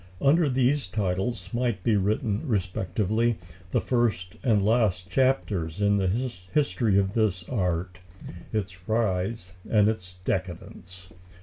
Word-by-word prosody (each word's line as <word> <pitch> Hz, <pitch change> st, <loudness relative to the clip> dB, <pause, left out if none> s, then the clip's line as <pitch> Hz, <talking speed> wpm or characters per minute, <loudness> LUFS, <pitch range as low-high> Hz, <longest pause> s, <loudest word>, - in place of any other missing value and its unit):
Under 150 Hz, +2 st, +4 dB
these 130 Hz, 0 st, +2 dB
titles 95 Hz, +1 st, -2 dB
might 120 Hz, -6 st, -1 dB
be 115 Hz, -, +3 dB
written 105 Hz, +1 st, 0 dB
respectively 105 Hz, +2 st, 0 dB, 0.3 s
the -, -, +1 dB
first 110 Hz, -8 st, 0 dB
and 110 Hz, -7 st, +2 dB
last 105 Hz, -5 st, +1 dB
chapters 105 Hz, -11 st, +1 dB
in 100 Hz, 0 st, +3 dB
the 95 Hz, -1 st, +1 dB, 0.4 s
history 120 Hz, -8 st, +2 dB
of 95 Hz, 0 st, +1 dB
this 100 Hz, -6 st, 0 dB
art 90 Hz, -5 st, -2 dB, 0.5 s
its 95 Hz, -3 st, -4 dB
rise 100 Hz, -3 st, 0 dB, 0.2 s
and 105 Hz, -2 st, +4 dB
its 90 Hz, -5 st, -3 dB
decadence. 90 Hz, 0 st, -5 dB
100 Hz, 120 wpm, -26 LUFS, 90-115 Hz, 0.5 s, Under